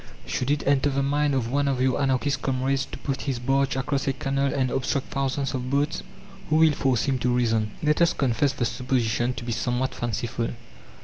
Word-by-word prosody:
Should 125 - -2
it 145 0 0
enter 140 0 +3
the 140 0 0
mind 145 0 +1
of 120 -3 -1
one 140 +1 +1
of 135 -2 0
your 130 +2 +2
Anarchist 135 0 +1
'comrades' 135 +1 0
to - - -8
put 135 -1 -3
his 130 - -1
barge 135 +3 +1
across 135 +1 -1
a 135 - +2
canal 135 -1 0
and 130 -1 0
obstruct 135 +1 -1
thousands 135 0 -1
of 130 -1 -3
boats, 145 +3 0 0.5
who 155 - +2
will 160 0 +6
force 130 -5 +1
him 135 -3 0
to 125 +1 +1
reason?" 115 -3 +1
Let 150 +2 +2
us 170 - +5
confess 135 +1 +1
the 130 -3 -1
supposition 120 0 0
to - - -6
be 120 - -3
somewhat 125 +3 -1
fanciful. 120 +1 -2
135 Hz, 205 wpm, -25 LUFS, 125-140 Hz, 0.5 s, will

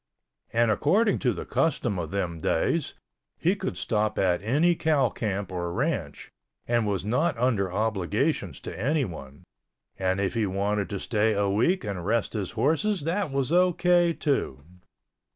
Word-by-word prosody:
And 115 -1 +3
according 200 - +2
to 125 - +1
the 95 - -5
custom 130 - 0
of 80 -3 -4
them 90 -4 -3
days - - 0 0.4
he 180 +4 +2
could 190 -1 -4
stop 110 -1 -1
at 90 -2 +2
any 145 - +3
cow 155 -6 +2
camp 100 -3 -3
or 85 -1 -3
ranch 115 - -3 0.4
and 120 -2 +1
was 100 -2 -1
not 135 +6 +1
under 115 -6 +1
obligations 105 - -1
to - - -7
anyone, 95 - -3 0.6
and 95 0 0
if 100 -1 0
he 115 -3 0
wanted 100 +1 -1
to 100 - -3
stay 110 +1 +1
a 100 -1 +1
week 130 - +2
and 100 -5 -4
rest 110 +3 0
his 100 -5 -3
horses 185 +7 +1
that 170 +2 -1
was 135 +1 -1
O.K. 175 -1 +3
too. 135 - -1
110 Hz, 155 wpm, -26 LUFS, 100-150 Hz, 0.6 s, And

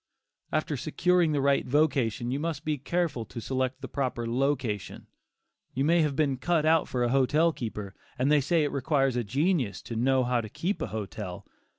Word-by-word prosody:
After 155 -1 0
securing 175 +4 +2
the 145 -2 +1
right 140 0 +3
vocation, 130 -5 +1
you 135 - -1
must 165 0 -3
be 150 -2 -1
careful 165 -4 -1
to 115 - -8
select 130 +2 -2
the 130 - -5
proper 125 -2 -2
location. 120 -4 -1 0.7
You 135 +2 +1
may 170 +2 +4
have 150 -3 0
been 140 -3 +1
cut 155 +4 +1
out 160 0 +4
for 125 -1 -1
a 120 - +1
hotel 145 +6 +3
keeper, 105 -6 -5 0.2
and 130 +3 +2
they 150 -1 +5
say 160 +3 +2
it 145 - -1
requires 135 -1 +1
a 120 - 0
genius 135 - 0
to 115 - -6
"know 130 +3 +2
how 125 -1 +1
to 110 - -8
keep 185 - -3
a - - -1
hotel." 105 -3 -6
135 Hz, 195 wpm, -28 LUFS, 120-155 Hz, 0.7 s, they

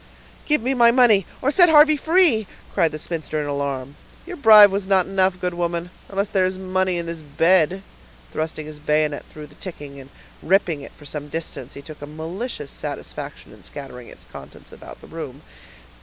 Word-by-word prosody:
"Give 300 -6 +1
me 260 +2 0
my 240 -2 +5
money, 235 -6 +4 0.2
or 275 - +2
set 350 +3 +6
Harvey 305 0 +7
free," 315 - +2 0.3
cried 165 - +2
the 155 - -5
spinster 155 -1 -4
in 150 - -2
alarm. 140 -1 -4 0.3
"Your 360 +1 -7
bribe 215 - +8
was 195 0 -2
not 190 -2 +3
enough, 190 -1 +1
good 180 -1 -2
woman, 175 0 -3 0.2
unless 200 +1 -1
there 190 -2 +2
is 185 0 -4
money 185 -1 0
in 170 - -2
this 165 -1 -6
bed." 170 +5 +2 0.5
Thrusting 155 -1 -4
his 155 -1 -10
bayonet 150 0 0
through 150 -1 -10
the 150 - -18
ticking 145 -5 -9
and 135 0 -13 0.3
ripping 170 -4 +1
it - - -10
for 145 - -17
some 145 0 -5
distance, 155 -4 -6
he 140 - -10
took 155 -1 -12
a 145 - -7
malicious 160 - -6
satisfaction - - -7
in - - -17
scattering 125 -4 -10
its - - -13
contents - - -13
about - - -12
the - - -14
room. - - -8
175 Hz, 190 wpm, -22 LUFS, 150-200 Hz, 0.5 s, bribe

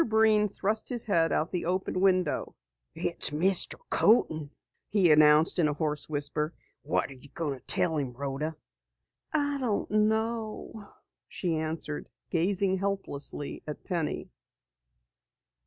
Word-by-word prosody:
Breen 220 -2 +3
thrust 210 +2 -2
his 240 -2 -2
head 165 -6 +2
out 160 - 0
the 180 - -2
open 185 +1 -1
window. 185 -5 +1 0.4
"It's - - +1
Mr. 175 +5 +3 0.2
Coaten," 160 -9 +3 0.4
he 190 -6 +4
announced 150 +3 +5
in 160 - +4
a 150 - 0
hoarse 150 -1 -2
whisper. 150 +2 -2 0.3
"What - - -1
are - - -7
you 135 +2 -15
going 145 -5 -4
to - - -35
tell 160 -2 +3
him 135 -4 -2
Rhoda?" 140 +4 -3 0.8
"I 285 -2 0
don't 230 -7 -1
know," 220 0 -1 0.4
she 175 -3 -2
answered, 155 -1 -4 0.2
gazing 190 +2 +1
helplessly 190 -8 -3
at 150 - -6
Penny. 170 -5 -3
175 Hz, 130 wpm, -29 LUFS, 150-210 Hz, 0.8 s, announced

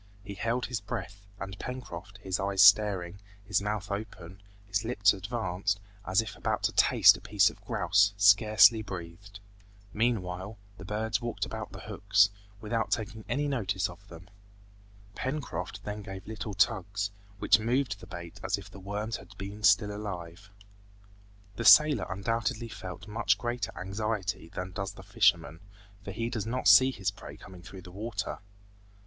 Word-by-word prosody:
He 100 0 -7
held 115 +5 -1
his 120 -5 -3
breath, 100 0 -7
and 95 -1 -7
Pencroft, 105 -7 -7
his 95 -1 -2
eyes 95 0 +3
staring, 100 -3 +4 0.3
his 100 0 +1
mouth 105 -1 -3
open, 95 -3 -7 0.2
his 100 +1 -1
lips 105 -3 +3
advanced, 100 -1 -2 0.3
as 95 +4 +3
if 110 0 -8
about - - -2
to - - +2
taste - - +6
a - - -15
piece - - +3
of - - -20
grouse, 100 +2 +2
scarcely 110 +3 +6
breathed. 100 0 -9 0.5
Meanwhile, 105 -3 -1 0.2
the 95 - -9
birds 110 +2 -2
walked 120 -1 -3
about - - -6
the - - -9
hooks, 100 0 +2 0.3
without 110 +1 -2
taking 110 -1 -3
any 145 +1 0
notice 100 -10 -1
of 95 +3 -16
them. 85 -1 -13 0.9
Pencroft 115 - -4
then 105 +1 -5
gave 95 -1 -9
little 110 -2 -6
tugs 100 +2 0 0.3
which 105 - +4
moved 115 -1 0
the - - -12
bait 85 -1 -9
as - - 0
if - - -11
the 100 - -11
worms 105 +3 -4
had - - -15
been 100 +2 -7
still 105 -1 +4
alive. 95 -2 -7 1.1
The 115 - -3
sailor 150 +4 +7
undoubtedly 115 +3 -2
felt 95 0 -8
much 105 -2 +1
greater 120 +3 -3
anxiety 100 -2 -3
than 90 +2 -6
does 95 +2 -4
the 95 - -12
fisherman, 95 -7 +2 0.4
for - - -8
he 115 +4 -3
does 110 -4 -3
not 125 +2 -1
see 130 0 +8
his 100 -7 -2
prey 100 - -11
coming 90 -2 -13
through 95 +1 -11
the 90 - -11
water. 105 +1 -4
100 Hz, 160 wpm, -29 LUFS, 95-110 Hz, 1.1 s, see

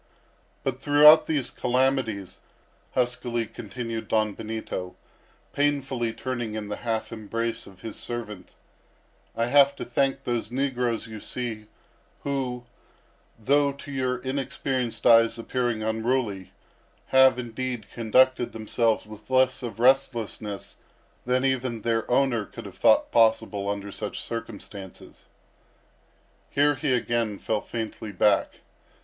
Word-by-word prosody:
"But 130 -1 -2
throughout 150 +2 +7
these 145 -5 -1
calamities," 125 -6 0 0.6
huskily 120 -2 0
continued 115 +2 -6
Don 110 -1 +1
Benito, 110 -4 -5 0.6
painfully 135 -5 0
turning 120 -2 -4
in 105 -1 -5
the 105 - -3
half 115 -2 -2
embrace 115 +1 -3
of 95 -1 -15
his 110 -2 -7
servant, 110 -5 -6 0.8
"I 115 - +1
have 140 +2 +5
to - - -6
thank 135 +2 0
those 120 -2 -2
negroes 125 -4 -1
you 110 -2 -8
see, 110 -2 -5 0.6
who, 130 -3 -2 0.7
though 140 +5 +2
to 140 +1 -10
your 130 -2 -1
inexperienced 130 -1 -2
eyes 115 -1 +6
appearing 120 -1 -1
unruly, 110 -4 -1 0.6
have, 130 -1 +6
indeed, 125 -1 -4
conducted 125 +2 +3
themselves 115 +1 0
with 105 +1 -13
less 130 0 +3
of 120 -2 -6
restlessness 115 -5 +1 0.5
than 130 +1 +2
even 125 -4 -1
their 115 -1 0
owner 125 -3 +2
could - - -10
have - - -11
thought - - +4
possible 110 -3 +2
under 100 0 -4
such - - -5
circumstances." 100 -4 -8 1.2
Here 145 +1 +3
he 145 0 -1
again 115 -3 -1
fell 110 +1 -1
faintly 110 -2 -5
back. 100 +1 +2
120 Hz, 120 wpm, -26 LUFS, 110-130 Hz, 1.2 s, throughout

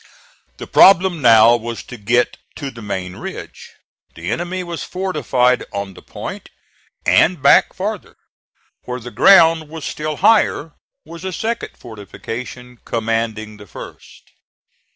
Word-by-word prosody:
The - - -7
problem 185 -3 +5
now 115 -1 +7
was 115 0 -5
to 125 - -10
get 120 +3 0 0.2
to 140 -3 -6
the 115 - -12
main 95 -3 -5
ridge. - - -9 0.5
The 85 +2 -5
enemy 180 +2 -3
was 170 -2 -6
fortified 150 -9 0
on 100 -1 -5
the - - -14
point; - - -8 0.6
and 175 -1 +3
back 140 0 +5
farther, 205 +1 -5 0.7
where 125 0 -4
the 120 +1 -9
ground 165 -4 +5
was 160 -1 -8
still 155 0 -4
higher, 165 -5 +2 0.3
was 165 +2 -11
a 190 - -3
second 225 +6 -4
fortification 120 +2 -9
commanding 115 -1 -3
the 105 0 -14
first. - - -13
125 Hz, 130 wpm, -18 LUFS, 115-170 Hz, 0.7 s, now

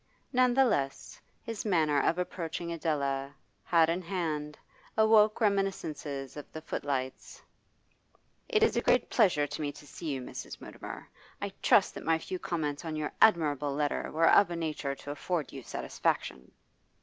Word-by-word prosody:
None 250 -1 +4
the 270 0 +6
less, 135 - -2 0.2
his 230 -3 -5
manner 155 -8 +2
of 170 - +1
approaching 170 -1 -3
Adela, 140 -4 -1 0.3
hat 165 -1 +4
in 170 +3 0
hand, 160 -5 -3 0.4
awoke 220 -1 +5
reminiscences 165 - -1
of 150 - -9
the 160 - -7
footlights. 135 -4 -4 1.1
'It 435 -2 +3
is 450 - +3
a - - +2
great - - +2
pleasure 180 -10 +4
to 145 - -6
me 145 -1 -1
to 150 - -13
see 160 +3 -8
you, 140 -3 -1
Mrs. 125 - -8
Mutimer. - - -9 0.3
I - - -4
trust - - +4
that - - -8
my 165 0 +3
few 180 +3 -5
comments 155 -5 -2
on 160 -2 -4
your 155 -1 -2
admirable 150 -8 +4
letter 145 0 -1
were 165 +1 +3
of 200 - +6
a 175 - -3
nature 155 -4 -2
to 145 - -8
afford 155 +2 -3
you 135 - -7
satisfaction. 65 - -2
160 Hz, 160 wpm, -30 LUFS, 145-185 Hz, 1.1 s, the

